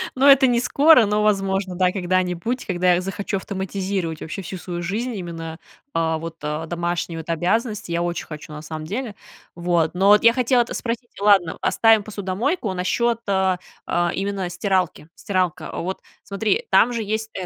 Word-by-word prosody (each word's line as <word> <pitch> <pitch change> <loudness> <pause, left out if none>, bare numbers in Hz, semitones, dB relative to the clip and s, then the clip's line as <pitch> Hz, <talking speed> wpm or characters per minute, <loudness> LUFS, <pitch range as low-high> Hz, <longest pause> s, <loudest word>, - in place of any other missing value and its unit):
Ну, 260 +1 +2
это 275 -1 +7
не 240 -1 +2
скоро, 280 0 +5
но, 210 +1 +1
возможно, 195 -2 0
да, 180 0 +2
когда-нибудь, 185 +5 -1
когда 180 -1 +2
я 175 - 0
захочу 195 +2 -3
автоматизировать 190 -3 -3
вообще 160 +5 -5
всю 185 +1 -6
свою 175 -1 -5
жизнь, 220 +8 -2
именно, 165 -3 -6 0.3
а, 160 -1 +1
вот, 165 0 -7
а, 150 +2 -3
домашние 170 0 -3
вот 160 - -9
обязанности. 210 +4 -1
Я 170 0 0
очень 175 0 -3
хочу 155 -1 -9
на 150 - -7
самом 155 0 -7
деле. 215 +4 -4 0.4
Вот, 170 -2 +1
но 190 +3 +3
вот 210 0 +6
я 230 0 +7
хотела 250 0 +3
это 235 - -3
спросить. 235 0 -4
Ладно, 200 -5 +3
оставим 225 -2 +4
посудомойку. 205 - -2
Насчёт, 230 +6 0
а 190 -2 +2 0.3
а, 175 0 0
именно 195 -2 -2
стиралки. 180 -3 -1
Стиралка. 185 -4 -2
Вот, 185 +2 -4 0.2
смотри, 220 - -1
там 245 +2 +5
же 230 -2 -2
есть, 220 +1 -2
э, 185 - -4
190 Hz, 175 wpm, -22 LUFS, 175-215 Hz, 0.4 s, это